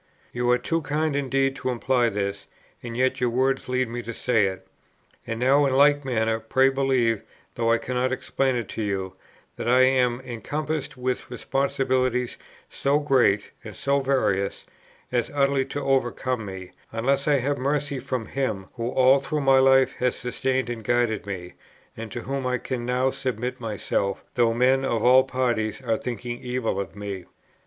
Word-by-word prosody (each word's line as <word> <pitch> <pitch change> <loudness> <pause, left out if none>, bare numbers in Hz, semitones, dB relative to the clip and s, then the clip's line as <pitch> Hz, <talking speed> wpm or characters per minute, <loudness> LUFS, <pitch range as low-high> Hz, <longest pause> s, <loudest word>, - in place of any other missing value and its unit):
You 120 0 0
are 125 - +5
too 165 +5 -1
kind 150 0 -1
indeed 135 -1 +1
to - - -3
imply 125 0 +1
this, 100 -1 -3 0.3
and 120 -1 -6
yet 130 0 +1
your 125 - +2
words 130 +2 0
lead 130 0 +1
me 120 +1 -5
to 115 -1 -7
say 115 -5 +2
it. 95 0 -6 0.6
And 115 0 -3
now 135 +4 +4
in 135 - 0
like 145 +1 +5
manner, 110 -3 0
pray 130 +4 +3
believe, 130 -5 +1 0.3
though 115 0 +1
I 115 - +4
cannot 125 +2 -1
explain 130 0 0
it 120 -4 -2
to - - -4
you, 95 -2 -2 0.4
that 115 - -2
I 125 +1 +5
am 125 -2 +3
encompassed 145 +4 -4
with 125 0 -2
responsibilities, 130 -1 0 0.3
so 140 +1 +1
great 130 -9 +2
and - - -9
so 140 +1 +1
various, 130 -8 0 0.5
as 120 -2 0
utterly 140 -1 +2
to 145 +1 -5
overcome 130 -3 0
me, 95 -1 -8 0.2
unless 135 +5 0
I 145 -1 +4
have 140 +2 -1
mercy 140 0 -1
from 130 -2 -3
Him, 110 -9 -3
who 115 0 -2
all 130 +2 +5
through 150 +2 -2
my 135 -1 +5
life 135 0 +5
has 125 -1 +1
sustained 130 +1 -1
and 115 -2 -6
guided 115 -3 0
me, 90 -3 -6 0.4
and 115 -1 -7
to 120 - -5
whom 135 0 -3
I 125 0 +1
can 120 0 -4
now 125 +1 +1
submit 125 0 -3
myself, 100 -3 -2
though 120 -2 +3
men 130 +3 +3
of 115 -4 0
all 130 +1 +7
parties 120 -5 -1
are 115 -3 +1
thinking 120 +1 -5
evil 125 -4 -2
of 100 0 -5
me." 100 -3 -6
125 Hz, 175 wpm, -25 LUFS, 115-135 Hz, 0.6 s, all